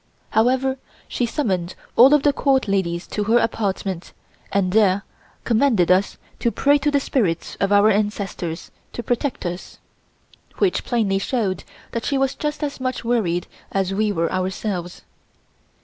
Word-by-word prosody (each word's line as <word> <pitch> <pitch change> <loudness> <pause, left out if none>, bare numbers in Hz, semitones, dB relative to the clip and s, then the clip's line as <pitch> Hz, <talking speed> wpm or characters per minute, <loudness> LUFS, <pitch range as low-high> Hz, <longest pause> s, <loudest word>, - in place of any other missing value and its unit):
However, 260 +4 +2 0.3
she 245 - -1
summoned 190 - -2 0.2
all 265 +5 +8
of 290 - +1
the 290 - +4
Court 270 -4 +2
ladies 180 -3 -1
to 210 - -2
her 225 +3 +4
apartment 195 -5 -2 0.4
and 190 -2 +1
there 200 -2 +3 0.4
commanded 225 -7 +3
us 190 +2 +2 0.2
to 235 - +2
pray 285 +4 +3
to 295 - +1
the 285 -1 +2
spirits 200 - -1
of 195 - +1
our 205 +1 +6
ancestors 200 -5 -2 0.2
to 240 - -5
protect 245 0 -2
us, 175 +1 -5 0.8
which 385 -3 +1
plainly 210 -5 +1
showed 200 -3 -1 0.3
that 230 - -3
she 280 - 0
was 270 0 +1
just 300 +1 -3
as 285 -2 -3
much 255 -1 -3
worried 200 -8 0 0.3
as 195 -1 0
we 210 +1 +1
were 165 -4 -1
ourselves. 185 -1 -3
215 Hz, 150 wpm, -22 LUFS, 190-255 Hz, 0.8 s, all